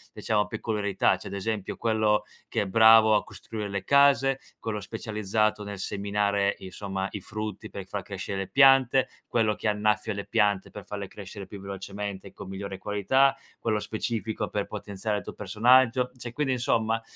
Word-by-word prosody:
diciamo 105 -1 +1
peculiarità. 105 -3 0
C'è, - - -10
ad - - -7
esempio, 100 0 -3
quello 110 -2 +2 0.2
che - - -1
è - - -1
bravo 110 +1 +7
a 105 - +2
costruire 110 -2 -6
le 100 -1 -3
case, 135 0 +4 0.2
quello 110 -2 -3
specializzato 105 +1 -1
nel 100 -1 -6
seminare, 100 0 0
insomma, 95 0 -4
i 105 - -5
frutti 105 +2 -6
per 100 - -7
far 100 0 -4
crescere 100 0 -5
le 95 - -3
piante, 135 -1 +5 0.2
quello 110 -2 +1
che - - -3
annaffia 105 +1 +1
le 100 0 -5
piante 100 -2 +1
per 105 -3 -10
farle 100 -1 -5
crescere 100 0 -9
più 100 - -9
velocemente 100 0 -6
e - - -12
con - - -9
migliore 95 0 -6
qualità, 105 +8 +2 0.2
quello 110 -2 0
specifico 110 0 -3
per 100 -1 -2
potenziare 105 0 -3
il - - -5
tuo - - -7
personaggio. 125 +5 +3
Cioè, 120 -1 -7
quindi 135 +1 0
insomma, 115 -2 +1
105 Hz, 170 wpm, -27 LUFS, 100-115 Hz, 0.2 s, bravo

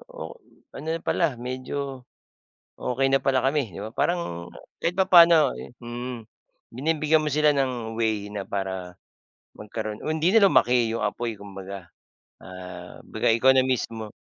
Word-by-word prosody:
oh, - - -8
hmm, - - -29
ano 155 - -8
rin 165 - -7
pala 160 -7 +1
medyo 130 +2 -5 0.8
okey 135 +2 0
na 135 0 +2
pala 135 -1 +3
kami, 135 -5 0
'di 85 - -8
ba? 110 - -5
Parang 85 - -1 0.3
kahit 170 - +1
papaano, 170 -4 +6
eh - - -9
hmm. 120 -1 -6 0.5
Binibigyan 155 +3 +2
mo 150 - -1
sila 150 0 +3
ng 125 -5 -1
way 110 -3 0
na 105 -1 -4
para 95 -2 -5 0.5
magkaroon 105 0 -6
o - - -4
hindi 160 +4 +1
na 225 - +6
lumaki 120 -2 +3
'yong 115 -1 -1
apoy 115 +1 -3
kumbaga. 100 -2 -9 0.5
Ah, 90 -1 -10
baga - - -1
ikaw 125 +4 +5
na 130 0 +4
mismo 115 -4 -2
120 Hz, 155 wpm, -25 LUFS, 105-145 Hz, 0.8 s, papaano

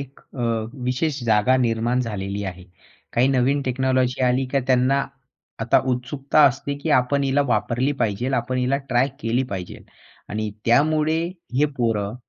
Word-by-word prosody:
एक 140 0 -10
अ, 130 - -11 0.4
विशेष 130 +2 -1
जागा 110 +3 +3
निर्माण 120 0 +1
झालेली 100 -3 -4
आहे. 90 -1 -7 0.5
काही 125 +3 +3
नवीन 135 +2 +2
टेक्नॉलॉजी 130 0 0
आली 125 +2 +2
का, 140 - +3
त्यांना 130 +2 +3 0.6
आता 115 - +3
उत्सुकता 135 +4 +1
असते 140 +2 -1
की 155 +3 -3
आपण 140 +3 -1
हिला 135 +1 +2
वापरली 125 +3 0
पाहिजेल, 120 +4 0
आपण 130 +1 -1
हिला 125 +2 +1
ट्राय 130 +2 +2
केली 115 +3 0
पाहिजेल. 95 -3 -6 0.4
आणि 110 0 -3
त्यामुळे 155 +6 +3 0.4
हे 150 - +5
पोरं, 110 -4 -1
125 Hz, 145 wpm, -22 LUFS, 115-135 Hz, 0.6 s, हे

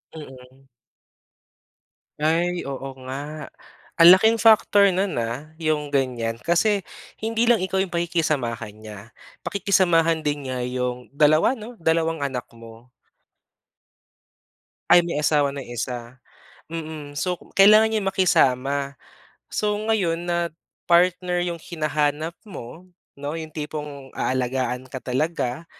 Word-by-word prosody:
Mm. 130 -3 -13 1.5
Ay 170 +2 0
oo 135 0 -5 0.2
nga. 145 +3 -6 0.5
Ang 165 - +10
laking 220 +3 +3
factor 205 -2 +5
nun 190 +2 -1
ah, 125 +7 -5
yung 150 -2 -1
ganyan. 120 -4 -1
Kasi 200 +4 +2 0.4
hindi 225 +1 0
lang 235 -4 +3
ikaw 190 +1 -1
yung 190 -2 -2
pakikisamahan 150 -10 -1
niya, 110 -1 -10 0.5
pakikisamahan 165 -5 +2
din 145 -2 -2
niya 130 -1 -3
yung 125 0 -3
2 155 - +4
'no 230 +1 -10
dalawang 165 0 +1
anak 130 -3 -4
mo. 115 +1 -15 2.0
Ay 175 -1 +7
may 170 -3 -2
asawa 145 -2 +2
na 140 - -5
yung 120 -2 -9
isa, 120 0 -5 0.5
mm. 155 -3 -7
So 180 +2 -2 0.2
kailangan 215 +3 +7
niyang 205 -3 0
makisama. 140 -6 +2 0.6
So 210 -1 -1 0.2
ngayon 175 -6 0
na 170 -1 0 0.4
partner 180 +1 +3
yung 170 -1 -4
hinahanap 155 -1 -2
mo 170 - -10 0.3
'no, 145 +2 -4
'yong 160 -1 -6
tipong 150 -3 -6
aalagaan 130 0 -2
ka 130 0 -8
talaga. 135 +2 -2
155 Hz, 120 wpm, -23 LUFS, 130-175 Hz, 2.0 s, Ang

